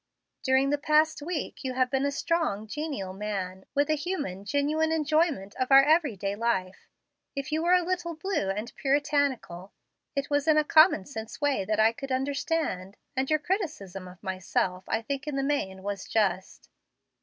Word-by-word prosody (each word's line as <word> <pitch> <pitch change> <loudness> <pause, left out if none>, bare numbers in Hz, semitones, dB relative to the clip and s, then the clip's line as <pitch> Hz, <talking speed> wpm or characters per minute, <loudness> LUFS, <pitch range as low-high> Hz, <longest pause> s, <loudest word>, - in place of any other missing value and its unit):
During 265 +1 +3
the 290 - +1
past 305 +1 +3
week 315 -1 -4
you 260 -1 -2
have 255 0 +1
been 270 +1 +1
a - - -1
strong, 285 - -1
genial 220 -7 -4
man, 190 -2 -4
with 285 +1 +3
a 310 - +2
human, 290 - -3
genuine 300 +5 +1
enjoyment 310 - +1
of 255 +1 -1
our 270 0 +9
every 305 -5 +3
day 195 +1 -3
life. 195 -5 -2 0.5
If 275 +1 -4
you 310 +1 +1
were 350 +2 +4
a 360 - +3
little 350 -1 -2
blue 325 - -1
and 210 +5 -3
puritanical, 275 -10 0 0.4
it 280 0 -1
was 290 +1 +1
in 310 -1 +5
a 305 - +5
common 310 - +5
sense 220 -5 -7
way 280 -9 +1
that 215 +2 0
I 220 +1 +6
could 270 +3 -7
understand, 265 - -1 0.2
and 265 0 0
your 310 - +4
criticism 295 - -3
of 180 0 -14
myself 185 0 -1
I 225 - -1
think 280 +4 -4
in 295 - -2
the 275 - 0
main 190 -10 -1
was 200 0 -4
just. 190 -4 -1
275 Hz, 180 wpm, -28 LUFS, 200-305 Hz, 0.5 s, our